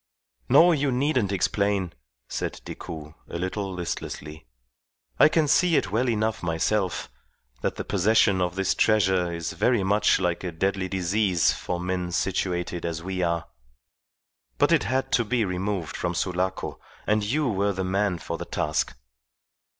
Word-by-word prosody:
"No, 175 Hz, +2 st, +7 dB
you 145 Hz, -4 st, +1 dB
needn't 125 Hz, -5 st, +1 dB
explain," 100 Hz, -1 st, 0 dB, 0.3 s
said -, -, -4 dB
Decoud, 75 Hz, -2 st, -8 dB, 0.2 s
a -, -, -4 dB
little 95 Hz, +2 st, -3 dB
listlessly. 80 Hz, -4 st, -6 dB, 0.7 s
"I -, -, +8 dB
can 155 Hz, -1 st, +2 dB
see 165 Hz, +3 st, +4 dB
it 95 Hz, -, +1 dB
well 120 Hz, +4 st, +1 dB
enough 110 Hz, -1 st, 0 dB
myself, 90 Hz, +3 st, 0 dB, 0.5 s
that -, -, -1 dB
the -, -, -4 dB
possession 100 Hz, -1 st, +3 dB
of 90 Hz, 0 st, -1 dB
this 95 Hz, -1 st, +1 dB
treasure 95 Hz, -5 st, +2 dB
is 85 Hz, -1 st, -4 dB
very 105 Hz, +4 st, +2 dB
much 100 Hz, +2 st, +3 dB
like 90 Hz, -2 st, -1 dB
a 90 Hz, -, -3 dB
deadly 95 Hz, +3 st, -1 dB
disease 95 Hz, -1 st, +2 dB
for 90 Hz, -, -4 dB
men 90 Hz, 0 st, -2 dB
situated 90 Hz, -1 st, -1 dB
as 85 Hz, -1 st, -3 dB
we 95 Hz, 0 st, -3 dB
are. 85 Hz, -2 st, 0 dB, 1.1 s
But -, -, +3 dB
it -, -, +3 dB
had 130 Hz, +2 st, -1 dB
to 120 Hz, -, +3 dB
be 115 Hz, 0 st, 0 dB
removed 90 Hz, -1 st, -3 dB
from 90 Hz, -1 st, -2 dB
Sulaco, 90 Hz, +1 st, -2 dB, 0.3 s
and 105 Hz, 0 st, +2 dB
you 145 Hz, +8 st, 0 dB
were 100 Hz, -2 st, +1 dB
the 95 Hz, -1 st, -3 dB
man 95 Hz, 0 st, 0 dB
for 80 Hz, -, -5 dB
the -, -, -5 dB
task." -, -, -1 dB
95 Hz, 155 wpm, -25 LUFS, 90-105 Hz, 1.1 s, I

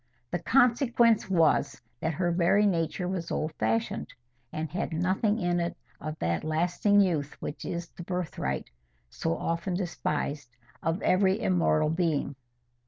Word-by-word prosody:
The 175 Hz, -, -1 dB
consequence 240 Hz, -, +3 dB
was 155 Hz, -6 st, +2 dB, 0.2 s
that 160 Hz, -1 st, -1 dB
her 175 Hz, 0 st, +1 dB
very 180 Hz, +4 st, +3 dB
nature 175 Hz, -1 st, 0 dB
was 180 Hz, -2 st, -3 dB
old 155 Hz, 0 st, -2 dB
fashioned, 115 Hz, +1 st, -1 dB, 0.4 s
and 155 Hz, +1 st, -3 dB
had 175 Hz, +2 st, -3 dB
nothing 185 Hz, +6 st, +1 dB
in 175 Hz, -4 st, 0 dB
it 170 Hz, 0 st, -2 dB, 0.2 s
of 155 Hz, +1 st, -5 dB
that 85 Hz, 0 st, -1 dB
lasting 175 Hz, +6 st, +2 dB
youth 155 Hz, -7 st, 0 dB
which 150 Hz, -, -6 dB
is 170 Hz, 0 st, -4 dB
the -, -, -11 dB
birthright—so 65 Hz, -, -4 dB
often 170 Hz, +2 st, -2 dB
despised—of 150 Hz, -3 st, -3 dB
every 190 Hz, 0 st, +3 dB
immortal 85 Hz, -, +2 dB
being. 160 Hz, -5 st, 0 dB
170 Hz, 130 wpm, -28 LUFS, 145-185 Hz, 0.4 s, consequence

